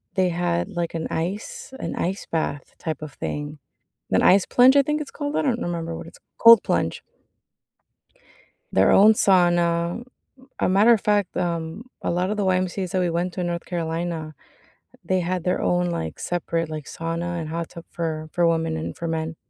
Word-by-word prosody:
they 185 Hz, -1 st, +2 dB
had, 175 Hz, 0 st, -1 dB
like, 175 Hz, -4 st, -3 dB
an 160 Hz, -, -2 dB
ice 185 Hz, +11 st, -4 dB
an -, -, -4 dB
ice 190 Hz, +3 st, -2 dB
bath 155 Hz, -3 st, -3 dB
type 160 Hz, -2 st, -4 dB
of 155 Hz, -2 st, -7 dB
thing. 150 Hz, +2 st, -5 dB, 0.5 s
An -, -, +3 dB
ice 195 Hz, 0 st, +5 dB
plunge, 255 Hz, +2 st, +5 dB
I -, -, +8 dB
think 300 Hz, +2 st, -1 dB
it's 290 Hz, -, -7 dB
called, 290 Hz, 0 st, -4 dB
I -, -, +1 dB
don't 245 Hz, -4 st, 0 dB
remember 165 Hz, -1 st, -3 dB
what -, -, -8 dB
it's 165 Hz, -, -14 dB, 0.2 s
cold 230 Hz, -2 st, +9 dB
plunge. -, -, -1 dB, 1.7 s
Their -, -, +4 dB
own 215 Hz, +3 st, +7 dB
sauna. 175 Hz, 0 st, +2 dB, 0.5 s
A -, -, +1 dB
matter 200 Hz, +5 st, +5 dB
of 225 Hz, -, +3 dB
fact, 205 Hz, -2 st, 0 dB
um, 170 Hz, +3 st, -3 dB, 0.2 s
a -, -, -1 dB
lot 180 Hz, +2 st, 0 dB
of 210 Hz, -, -1 dB
the 205 Hz, -, 0 dB
YMCAs 185 Hz, 0 st, 0 dB
that 185 Hz, -, 0 dB
we 180 Hz, -1 st, +1 dB
went 175 Hz, +2 st, -1 dB
to -, -, -4 dB
in 175 Hz, -, -1 dB
North 170 Hz, 0 st, -3 dB
Carolina, 165 Hz, -2 st, -3 dB, 0.7 s
they 185 Hz, -1 st, +1 dB
had 180 Hz, 0 st, -2 dB
their 180 Hz, -, 0 dB
own, 175 Hz, 0 st, +1 dB
like, 80 Hz, -, -4 dB
separate, 165 Hz, -2 st, -2 dB
like, 155 Hz, -3 st, -6 dB
sauna 170 Hz, +1 st, -4 dB
and 155 Hz, -, -5 dB
hot 165 Hz, +1 st, -4 dB
tub 170 Hz, -, -10 dB
for 155 Hz, -2 st, -4 dB
for 175 Hz, -1 st, +2 dB
women 165 Hz, -1 st, +1 dB
and 160 Hz, -, -5 dB
for 170 Hz, -, -4 dB
men. 160 Hz, 0 st, -3 dB
175 Hz, 190 wpm, -23 LUFS, 165-185 Hz, 1.7 s, cold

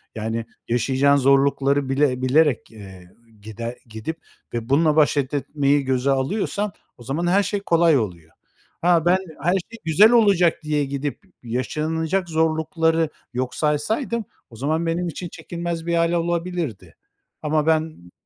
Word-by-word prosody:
Yani, 115 Hz, +1 st, -3 dB, 0.2 s
yaşayacağın 130 Hz, +4 st, +2 dB
zorlukları 140 Hz, 0 st, +2 dB
bile 135 Hz, -2 st, +1 dB
bilerek, 140 Hz, 0 st, +2 dB
eee, 95 Hz, -4 st, -13 dB, 0.3 s
gider 115 Hz, +3 st, -6 dB
gidip 110 Hz, +9 st, -6 dB, 0.4 s
ve 115 Hz, -1 st, -4 dB
bununla 150 Hz, +2 st, +3 dB
baş 150 Hz, -1 st, +3 dB
et 140 Hz, 0 st, -1 dB
etmeyi 145 Hz, 0 st, +1 dB
göze 130 Hz, +1 st, +1 dB
alıyorsan 200 Hz, +8 st, -1 dB, 0.2 s
o 120 Hz, -, -13 dB
zaman 145 Hz, +8 st, -2 dB
her 195 Hz, +3 st, +3 dB
şey 205 Hz, +1 st, -2 dB
kolay 170 Hz, -5 st, +3 dB
oluyor. 85 Hz, -8 st, -4 dB, 0.5 s
Ha, 170 Hz, -1 st, +3 dB
ben 180 Hz, +2 st, +5 dB, 0.3 s
her 175 Hz, -, +3 dB
şey 210 Hz, +5 st, -4 dB
güzel 200 Hz, +8 st, +6 dB
olacak 200 Hz, -8 st, +4 dB
diye 150 Hz, -1 st, 0 dB
gidip 140 Hz, +6 st, -4 dB, 0.2 s
yaşanacak 160 Hz, +9 st, -2 dB
zorlukları 160 Hz, 0 st, +1 dB, 0.2 s
yok 125 Hz, +1 st, -3 dB
saysaydım 215 Hz, -, -1 dB, 0.2 s
o 115 Hz, -, -14 dB
zaman 155 Hz, +7 st, -1 dB
benim 170 Hz, +2 st, -1 dB
için 175 Hz, +2 st, -6 dB
çekilmez 170 Hz, -1 st, -5 dB
bir 170 Hz, 0 st, 0 dB
hâl 170 Hz, 0 st, +2 dB
olabilirdi. 170 Hz, -, -2 dB, 0.5 s
Ama 155 Hz, 0 st, 0 dB
ben 155 Hz, -, -1 dB
150 Hz, 140 wpm, -22 LUFS, 130-170 Hz, 0.5 s, güzel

